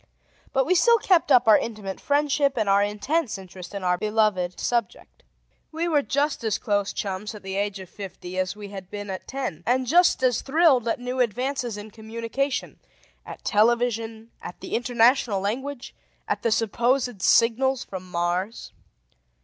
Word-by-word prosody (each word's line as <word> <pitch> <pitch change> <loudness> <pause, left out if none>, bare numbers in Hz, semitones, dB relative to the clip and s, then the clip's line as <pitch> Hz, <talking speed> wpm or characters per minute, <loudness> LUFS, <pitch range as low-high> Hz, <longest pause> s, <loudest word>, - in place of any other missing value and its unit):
But 265 0 +2
we 365 - +3
still 465 +7 +5
kept 365 -8 +2
up 250 -3 +6
our 215 - +7
intimate 210 -4 -6
friendship 285 -1 +1
and 215 -2 0
our 200 0 +4
intense 215 +6 -1
interest 185 0 -10
in 200 - -5
our 180 -1 +1
beloved 210 -4 0
subject. 235 -5 -3 0.5
We 330 +2 -2
were 305 -4 +3
just 285 -1 -1
as 220 -3 0
close 205 -4 0
chums 200 +2 -4
at 210 - -11
the 190 0 -5
age 200 0 -2
of 190 - -9
fifty 185 -1 -7
as 185 +1 -1
we 205 -1 -9
had 190 -2 -9
been 205 -1 -6
at 185 - -7
ten, 255 - -4
and 255 +4 +1
just 340 0 +4
as 250 -3 +2
thrilled 280 -5 +3
at 230 - 0
new 250 +1 -4
advances 245 0 -1
in 210 +1 -9
communication: 230 +5 -4 0.5
at - - -10
television, 230 0 +1
at 175 - -9
the - - -8
international 240 -2 +3
language, 250 +7 -4 0.3
at - - -1
the 230 - +1
supposed 235 +1 0
signals 255 +5 +3
from 185 -1 -8
Mars. 180 +5 -2
225 Hz, 165 wpm, -25 LUFS, 200-260 Hz, 0.5 s, our